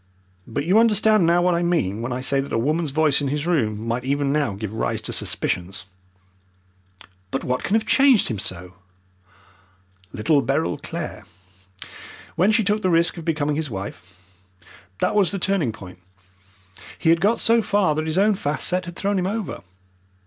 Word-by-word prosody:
But 140 +6 -3
you 190 +6 +4
understand 215 -4 +4
now 175 +1 +3
what 180 0 +3
I 170 - 0
mean 140 - 0
when 120 +2 -4
I 125 +1 -3
say 135 +1 +1
that 140 - -8
a - - 0
woman's 155 +6 0
voice 150 0 +2
in 140 - -1
his 145 +2 -2
room 110 -11 0
might 120 +2 -2
even 140 +1 0
now 145 -8 0
give 105 +1 -6
rise 110 - -1
to - - -5
suspicions." 90 +1 -2 1.4
"But 135 - -3
what 125 0 -1
can 200 - 0
have 220 - +1
changed 265 -5 +4
him 110 -4 -3
so?" 90 0 -4 1.4
"Little 140 +7 +1
Beryl 140 +4 -1
Clare, 165 -2 -6 1.1
when 190 +5 +3
she 220 +1 +2
took 210 +1 0
the 185 - +1
risk 170 0 +3
of 165 - -8
becoming 150 -2 0
his 155 -1 -3
wife. 95 -3 -8 0.8
That - - +1
was 205 -4 +3
the 200 - -3
turning 185 -9 0
point. 90 -4 -12 1.0
He 160 - +2
had 165 0 +2
got 215 +5 +2
so 230 0 +4
far 200 -6 +1
that 155 +1 -3
his 160 +2 -1
own 210 +2 +4
fast 150 -6 -1
set 180 0 0
had 175 0 -8
thrown 200 +1 -1
him 180 - -1
over. 210 0 -4
155 Hz, 185 wpm, -22 LUFS, 125-190 Hz, 1.4 s, you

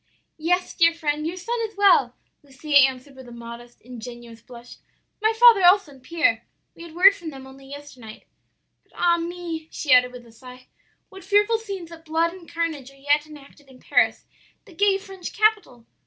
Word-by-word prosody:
"'Yes, 360 +3 -1
dear 335 -1 +3
friend, 305 -1 -2
your 350 +3 -5
son 465 +6 -4
is 440 -2 -5
well,' 360 -12 +4 0.3
Lucia 285 +1 -6
answered 265 0 +3
with 260 -1 -13
a - - -12
modest, 235 +1 -11
ingenuous 240 -1 -11
blush; 240 0 -14 0.4
'my 440 0 +3
father 450 -3 +6
also, 360 -2 +4
and 270 -2 -17
Pierre; 290 -6 0 0.3
we - - -16
had 335 -1 -12
word 385 +3 +7
from 345 -4 -9
them 270 -3 -11
only 270 0 -15
yesternight. 275 -6 -12 0.6
But - - -34
ah 340 -1 +2
me!' 335 -2 -6
she 280 -4 0
added 250 0 +4
with 250 -1 -12
a 230 - -18
sigh, 250 +2 -15 0.4
'what 385 0 -13
fearful 415 +3 +2
scenes 390 -6 -8
of 325 -1 -13
blood 330 +1 -1
and 360 -3 -14
carnage 325 -6 -4
are 275 - -20
yet 290 +2 0
enacted 290 -1 -16
in 255 -1 -17
Paris, - - +1 0.4
the 395 - -17
gay 395 +3 +2
French 385 -2 -10
capital! 420 - 0
310 Hz, 185 wpm, -23 LUFS, 255-360 Hz, 0.6 s, word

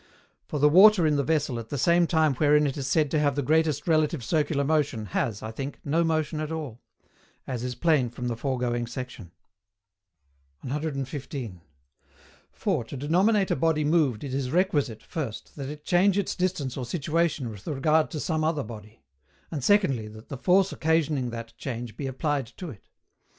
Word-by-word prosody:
For 150 - -3
the 145 +1 +5
water 190 +3 +7
in 150 -1 +3
the 140 - +1
vessel 145 -5 0
at 115 - -9
that 170 +5 +3
time 160 -3 +3
wherein 150 0 +4
it 140 - -1
is 135 -3 -4
said 150 +2 +2
to 155 - +2
have 145 -2 +2
the 145 - -1
greatest 160 +2 +1
relative 155 -4 +2
circular 145 +1 +1
motion, 145 -7 0
has, 105 +2 -2
I 110 - -4
think, 135 +5 -6
no 160 +4 +2
motion 155 -1 0
at 155 0 -3
all; 145 -8 -5 0.6
as 125 -3 -4
is 125 0 -3
plain 145 -3 +2
from 125 +1 -5
the 120 - -1
foregoing 120 -1 -1
section. 120 -7 -7 1.3
115. 135 - -4 0.9
For, 180 - -1
to 135 - -8
denominate 190 - +2
a - - +3
body 155 +1 +1
moved 150 -7 +2
it 135 -2 -5
is 135 -2 -1
requisite, 145 - 0
first, 135 -9 -6
that 140 -2 -5
it 150 0 -9
change 185 +2 +3
its 200 - -1
distance 180 -8 -1
or 130 - -3
situation 155 -4 -1
with 100 -2 -12
regard 155 +2 +2
to 155 - -5
some 155 0 -1
other 155 -3 0
body; 110 0 -11 0.5
and 145 -6 -4
secondly, 135 - +3
that 110 +1 -13
the 140 - -5
force 190 +5 +3
occasioning 155 -5 +1
that 115 0 -7
change 120 -3 -5
be 140 - -4
applied 140 0 -1
to 165 +6 -8
it. 105 - -15
145 Hz, 180 wpm, -26 LUFS, 125-160 Hz, 1.3 s, water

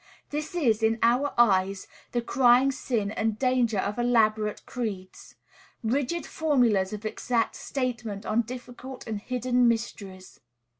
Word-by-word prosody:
This 305 +3 -4
is, 235 -10 +2
in 225 0 +2
our 250 +5 +3
eyes, 195 -4 +3 0.3
the 240 -1 -1
crying 250 +2 +4
sin 230 -6 -2
and 220 0 -1
danger 250 -4 +1
of 200 +4 -2
elaborate 215 -3 +1
creeds, 205 -7 -6 0.5
rigid 280 +8 -1
formulas 240 -11 +1
of 210 0 -6
exact 230 +1 -1
statement 235 -6 -4
on 220 +2 +2
difficult 250 +2 -9
and 215 -3 -4
hidden 250 +1 +1
mysteries. 195 - -3
235 Hz, 130 wpm, -27 LUFS, 215-255 Hz, 0.5 s, crying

